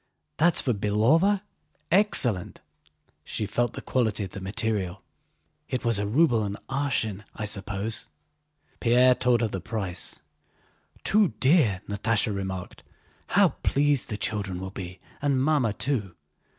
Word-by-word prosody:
"That's 170 +2 +3
for 125 - +1
Belóva? 135 - +3 0.5
Excellent!" 140 - +2 0.6
She 110 - -3
felt 120 +4 0
the - - -7
quality 110 -5 0
of 95 - -6
the 100 - -7
material. 100 -2 -2 0.7
"It 130 -1 -2
was 115 -3 +1
a 100 - -1
ruble 120 -1 +3
an 100 0 -3
arshin, 130 -7 -1
I 110 - -4
suppose?" 100 +2 -3 0.7
Pierre 125 +1 +5
told 125 -1 +2
her 115 - +2
the 95 -3 -5
price. 95 -7 -4 0.8
"Too 205 - +3
dear!" 130 - +4
Natásha 105 +1 +1
remarked. 95 -2 -5 0.5
"How - - +5
pleased 145 -2 +1
the 105 - -3
children 100 -4 -2
will 95 0 -6
be 95 -2 -7 0.2
and 140 -2 +2
Mamma 135 -5 +2
too! 105 -6 -2
110 Hz, 135 wpm, -26 LUFS, 100-130 Hz, 0.8 s, Pierre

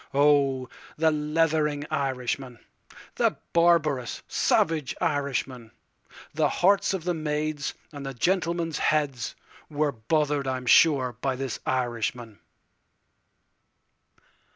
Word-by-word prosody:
Oh, 140 -3 +3 0.3
the 160 0 +3
leathering 150 -1 0
Irishman, 130 -3 -2 0.6
The - - +2 0.2
barbarous, 160 -7 +2
savage 155 -5 +1
Irishman—The 135 -5 -3
hearts 195 +1 +2
of 180 - -5
the 180 +1 0
maids, 150 -2 -2 0.2
and 145 -2 -8
the 135 -1 -6
gentlemen's 170 +2 0
heads, 145 -6 0 0.3
were 150 -1 0
bother'd 145 +4 0
I 130 0 -1
'm 125 - -8
sure 130 -2 +4
by 135 -1 0
this 135 0 -4
Irishman. 120 -3 -2
145 Hz, 100 wpm, -26 LUFS, 130-155 Hz, 0.6 s, sure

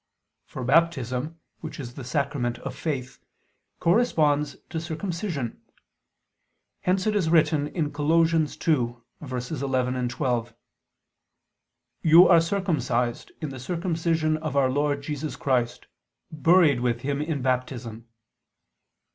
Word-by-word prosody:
For 130 - -6
Baptism, 145 0 +1 0.2
which 160 -1 -8
is 120 -3 -6
the 135 - -8
sacrament 130 -2 -1
of - - -7
Faith, 130 -6 -4 0.6
corresponds 155 -7 +2 0.2
to 160 - -2
circumcision. 165 - -4 1.2
Hence 185 +1 0
it 215 -1 +1
is 185 -6 +1
written 155 -3 +3 0.2
(Col. 145 0 -3
2:11, 130 -4 0
12): 120 -2 -1 1.5
"You 165 +3 +8
are 170 -2 +6
circumcised... 160 -10 -1
in 155 - -3
the 135 -1 -8
circumcision 165 0 0
of" 155 -2 -4
Our 130 -2 +3
Lord 145 0 0
Jesus 150 +1 -4
"Christ: 125 -3 -1 0.5
buried 155 -2 +4
with 120 -1 0
Him 140 +2 -2
in 150 -4 -2
Baptism." 125 -3 -2
145 Hz, 105 wpm, -25 LUFS, 125-165 Hz, 1.5 s, You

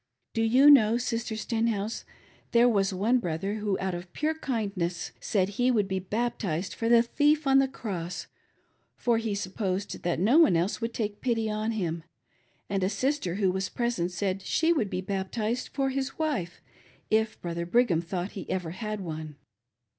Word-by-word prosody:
Do 225 - 0
you 255 +6 +7
know, 230 -5 +6
Sister 235 -2 -2
Stenhouse, 225 -1 -1 0.5
there 235 +1 +6
was 200 -4 +2
one 215 +7 +2
brother 195 +2 -2
who 210 -2 -1
out 190 -1 -2
of 175 0 -7
pure 310 +1 0
kindness 200 - -3
said 190 -2 0
he 245 +5 +1
would 215 -6 +2
be 190 -1 -1
baptized 195 -4 -2
for 230 - -2
the 235 0 +6
thief 295 +5 +2
on 270 0 +5
the 270 - +3
cross, 185 -9 -5 0.7
for 235 -2 +1
he 220 -3 -2
supposed 195 0 -3
that 175 -1 -1
no 230 - +5
one 195 - +6
else 180 +8 -1
would 230 0 -3
take 210 -2 -3
pity 225 -3 0
on 215 +1 -1
him, 170 -6 -2 0.6
and 195 -1 -1
a 185 - +2
sister 210 - -1
who 195 -2 +2
was 190 0 -2
present 235 -8 -1
said 190 +1 -2
she 325 - +2
would 225 -11 0
be 185 - -2
bap 190 0 -3
tized 235 +2 -1
for 270 -1 -1
his 270 0 -3
wife, 280 - -2 0.5
if 220 0 +1
Brother 170 0 -4
Brigham 190 -5 +3
thought 175 +2 -4
he 195 - -8
ever 180 -3 -2
had 215 +2 -4
one. 155 -3 -6
210 Hz, 180 wpm, -28 LUFS, 185-240 Hz, 0.7 s, you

